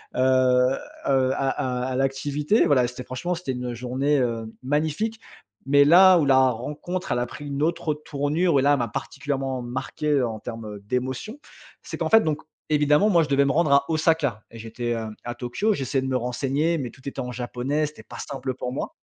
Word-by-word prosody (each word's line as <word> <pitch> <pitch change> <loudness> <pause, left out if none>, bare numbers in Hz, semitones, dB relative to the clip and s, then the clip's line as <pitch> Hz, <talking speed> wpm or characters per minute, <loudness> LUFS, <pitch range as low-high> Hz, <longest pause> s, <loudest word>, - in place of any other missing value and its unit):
Heu, - - -2
heu, 130 +1 +2
à 135 -1 0
à 125 -1 -2
à - - -2
l'activité. 145 - +1
Voilà, 125 -4 +3
c'était 125 +1 -8
franchement, 170 +9 -3
c'était 165 -6 -4
une 125 -1 -4
journée, 130 +4 0
heu, 115 -2 -1 0.2
magnifique. 155 - -1 0.5
Mais 140 +1 +5
là 185 +3 +8
où 150 - +2
la 130 -1 +5
rencontre 150 +10 -4
elle 120 - +1
a 120 - 0
pris 145 +4 -9
une 140 0 -3
autre 165 -2 0
tournure 150 +2 0
et - - +2
là, 145 +1 +5
elle 140 - +1
m'a 120 - 0
particulièrement 135 +2 -3
marquée 135 +3 -1
en 115 -3 -2
termes 110 -2 -7
d'émotions. 130 - -3 0.4
C'est - - -6
qu'en - - -1
fait, 225 0 +7
donc, 155 -1 -1 0.3
évidemment 150 +6 +3
moi, 170 -4 +4
je - - -3
devais 140 0 +4
me 135 - +2
rendre 155 -1 +2
à 140 0 +4
Osaka. 155 -8 +1
Et 115 - -11
j'étais, 120 +2 -4
hem, 110 -2 -3
à 120 0 -4
Tokyo. 130 - -1
J'essayais 135 -2 -1
de 130 - -3
me 130 - -1
renseigner 135 +7 0
mais 130 -4 -4
tout 130 - -19
était 140 - -5
en 125 0 -5
japonais, 130 +5 -2
c'était 150 - -12
pas - - -11
simple 135 -1 -4
pour 125 -1 -4
moi. - - -4
135 Hz, 205 wpm, -24 LUFS, 125-150 Hz, 0.5 s, là